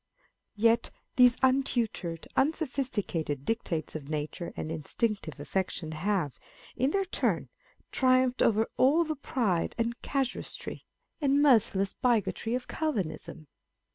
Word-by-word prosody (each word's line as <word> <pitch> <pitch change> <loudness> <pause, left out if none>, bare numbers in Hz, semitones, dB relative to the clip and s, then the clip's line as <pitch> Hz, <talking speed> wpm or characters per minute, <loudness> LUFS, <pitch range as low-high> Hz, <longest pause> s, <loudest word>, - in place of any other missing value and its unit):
Yet 230 +2 +3 0.3
these 250 -1 +6
untutored, 240 -10 +1
unsophisticated 255 - -1
dictates 175 -8 -2
of 150 -2 -7
nature 155 +3 -3
and 155 - -4
instinctive 165 - -2
affection 165 +1 -2
have, 170 -3 -1 0.4
in 260 +3 +2
their 390 +5 +1
turn, 370 - -1 0.4
triumphed 255 -1 +3
over 220 0 +4
all 295 +6 +5
the 310 -1 -3
pride 230 - -1
of 235 +1 -1
casuistry, 270 -3 -3 0.3
and 280 -1 +3
merci 240 -8 +5
less 195 0 0
bigotry 235 -1 0
of 250 0 -4
Calvinism 185 - -3
230 Hz, 115 wpm, -29 LUFS, 170-260 Hz, 0.4 s, these